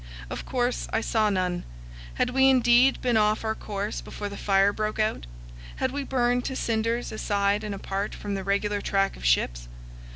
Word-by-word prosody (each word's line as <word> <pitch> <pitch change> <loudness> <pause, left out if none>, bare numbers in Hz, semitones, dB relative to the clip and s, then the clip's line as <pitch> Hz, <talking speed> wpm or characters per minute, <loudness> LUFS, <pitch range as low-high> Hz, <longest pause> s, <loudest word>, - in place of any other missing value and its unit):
Of - - -5
course 245 -1 -1
I 225 - +1
saw 220 -2 +1
none. 180 -3 -1 0.5
Had - - 0
we 265 +1 +5
indeed 250 0 +5
been 245 -3 +2
off 215 0 +2
our 220 - +1
course 205 -1 -4
before 205 - -6
the 200 - -8
fire 195 0 +3
broke 215 0 -2
out? 215 - -1 0.5
Had - - -1
we 285 0 -3
burned 245 -2 +1
to 265 - -3
cinders 230 0 -1
aside 205 -1 0
and 210 -1 -4
apart 195 +1 -3
from 205 -1 -5
the 195 -1 -3
regular 200 +1 0
track 195 0 0
of - - -12
ships? - - +1
215 Hz, 185 wpm, -26 LUFS, 200-240 Hz, 0.5 s, we